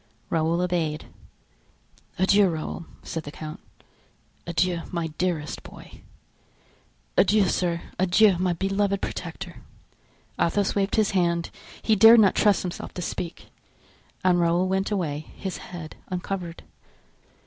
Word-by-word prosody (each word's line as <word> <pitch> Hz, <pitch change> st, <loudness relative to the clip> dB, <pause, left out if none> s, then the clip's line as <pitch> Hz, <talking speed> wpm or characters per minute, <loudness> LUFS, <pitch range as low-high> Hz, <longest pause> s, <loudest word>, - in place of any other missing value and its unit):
Raoul 165 Hz, +1 st, +1 dB
obeyed. 170 Hz, -4 st, -1 dB, 1.1 s
"Adieu, 195 Hz, +1 st, +4 dB
Raoul," 160 Hz, 0 st, -5 dB, 0.2 s
said 165 Hz, -, -4 dB
the 145 Hz, -, -8 dB
count; 155 Hz, 0 st, -8 dB, 0.9 s
"adieu, 170 Hz, +1 st, +1 dB
my 170 Hz, -2 st, -2 dB
dearest 170 Hz, -5 st, -1 dB
boy!" -, -, -13 dB, 1.1 s
"Adieu, 205 Hz, -1 st, +4 dB
sir, 170 Hz, -2 st, 0 dB, 0.2 s
adieu, 190 Hz, +2 st, +5 dB
my 185 Hz, 0 st, +1 dB
beloved 195 Hz, +2 st, 0 dB
protector." -, -, -6 dB, 0.8 s
Athos 200 Hz, +3 st, +1 dB
waved 200 Hz, -1 st, 0 dB
his 215 Hz, -2 st, +2 dB
hand—he 180 Hz, +4 st, -1 dB
dared 225 Hz, +3 st, +9 dB
not 200 Hz, -3 st, +5 dB
trust 205 Hz, -2 st, +3 dB
himself 180 Hz, -2 st, -6 dB
to 180 Hz, -, -4 dB
speak: 170 Hz, 0 st, -5 dB, 0.7 s
and 180 Hz, -1 st, +4 dB
Raoul 175 Hz, +2 st, +2 dB
went 190 Hz, +1 st, 0 dB
away, 155 Hz, -7 st, -2 dB
his 190 Hz, -2 st, -4 dB
head 175 Hz, -3 st, -9 dB
uncovered. 180 Hz, -2 st, -4 dB
180 Hz, 115 wpm, -25 LUFS, 170-195 Hz, 1.1 s, dared